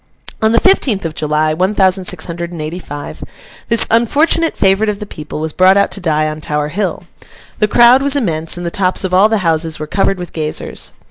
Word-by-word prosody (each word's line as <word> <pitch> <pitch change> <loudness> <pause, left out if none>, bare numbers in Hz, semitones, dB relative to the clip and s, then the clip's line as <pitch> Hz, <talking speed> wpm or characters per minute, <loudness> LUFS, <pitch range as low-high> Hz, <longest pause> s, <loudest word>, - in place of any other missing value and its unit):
On 220 0 +3
the 230 - +4
fifteenth 260 - +2
of 160 - -3
July, 155 0 0
one 185 +6 -1
thousand 190 -1 +2
six - - -1
hundred 170 0 -6
and 170 - -8
eighty 155 +4 -5
five, 145 -4 -8 0.4
this 230 -1 +2
unfortunate 300 +8 +2
favourite 195 +2 +2
of 210 - -2
the 210 - -7
people 150 -5 -8
was 160 0 -4
brought 185 +1 +4
out 200 - +2
to 190 - -3
die 155 -3 0
on 155 0 -5
Tower 150 -1 -2
Hill. 180 0 -3 0.6
The 210 - +3
crowd 240 +4 +5
was 280 0 +1
immense, 165 - -1
and 175 - -6
the 170 - -3
tops 185 +1 0
of 185 -1 -3
all 195 +4 +5
the 220 - +2
houses 160 -1 0
were 155 - -5
covered 195 +4 0
with 180 -1 -8
gazers. 155 -1 -4
185 Hz, 220 wpm, -15 LUFS, 155-210 Hz, 0.6 s, crowd